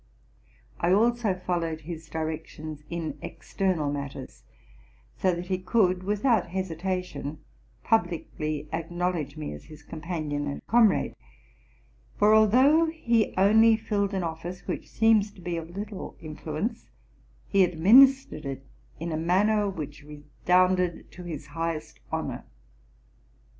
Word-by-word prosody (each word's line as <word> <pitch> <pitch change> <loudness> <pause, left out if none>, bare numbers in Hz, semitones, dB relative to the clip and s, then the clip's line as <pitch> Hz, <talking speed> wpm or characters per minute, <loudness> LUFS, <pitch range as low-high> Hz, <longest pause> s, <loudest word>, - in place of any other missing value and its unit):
I 170 - +1
also_ 220 -1 +2
followed 165 -3 -2
his 160 0 -8
directions 155 -1 -5
in 170 -1 -4
external 175 -7 -2
matters; 140 - -6 0.7
so 185 - +2
that 175 +1 -5
he 185 0 -1
could, 185 -1 +2
without 210 +1 +1
hesitation, 180 -4 -3 0.5
publicly 155 -7 -1
acknowledge 165 -3 -2
me 155 - -5
as 75 - -11
his 155 -1 -13
com 155 +1 -9
panion 150 -4 -3
and - - -8
comrade: 230 -2 +3 1.0
for, 210 +1 +5
although 260 +10 +5
he 235 -9 0
only 220 +3 +6
filled 205 -3 -1
an 190 - -1
office 170 +2 -5
which - - -4
seems 220 -2 +3
to - - -17
be 175 -1 -3
of 165 0 -5
little 205 -1 -6
influence, 155 +8 -5 0.6
he 195 -1 +4
administered 205 - +5
it 135 -1 -6 0.3
in 165 +1 -4
a 155 - -1
manner 200 +5 +2
which 155 -5 -6
redounded 180 +4 0
to 180 0 -10
his 160 -4 -6
highest 165 +1 -4
honor. - - -3
180 Hz, 125 wpm, -27 LUFS, 155-205 Hz, 1.0 s, only